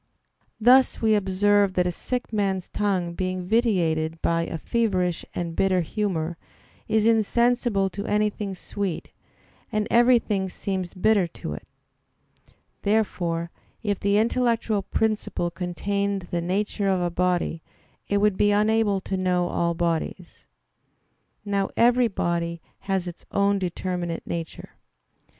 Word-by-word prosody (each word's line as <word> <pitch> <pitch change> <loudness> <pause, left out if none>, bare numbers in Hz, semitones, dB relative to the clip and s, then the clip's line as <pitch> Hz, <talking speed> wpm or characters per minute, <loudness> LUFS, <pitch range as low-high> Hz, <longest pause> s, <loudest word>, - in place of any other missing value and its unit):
Thus 255 +4 +5
we 220 -1 +3
observe 205 0 +3
that 180 - +2
a 180 - +1
sick 245 +6 -4
man's 195 -3 0
tongue 190 -4 -1
being 185 0 -3
vitiated 170 -8 +1
by 165 0 +1
a - - -4
feverish 185 -3 0
and 170 -2 -3
bitter 185 -2 +2
humor, 170 -2 -2 0.5
is 220 -1 +2
insensible 230 -2 +2
to 200 +3 -5
anything 210 -1 0
sweet, 195 -1 -4 0.6
and 215 -1 0
everything 235 -5 +3
seems 185 -1 -4
bitter 200 -1 +3
to 75 - -7
it. 75 - -9 1.1
Therefore, 175 -6 0 0.3
if 205 -3 -1
the 200 0 +2
intellectual 230 -2 +1
principle 215 -4 -1
contained 195 +2 -2
the 175 - 0
nature 200 +3 -1
of 190 -1 +2
a 175 -1 -1
body 175 -2 0 0.5
it 205 - +1
would 205 -1 +2
be 205 - +4
unable 210 -1 +2
to 190 - -3
know 180 -1 +1
all 170 0 0
bodies. 170 +1 -3 1.0
Now 200 -1 0
every 245 +1 +5
body 170 -4 -2 0.3
has 190 -2 0
its 175 - -8
own 200 0 +2
determinate 175 -2 -3
nature. 165 -2 -6
195 Hz, 130 wpm, -25 LUFS, 175-210 Hz, 1.1 s, Thus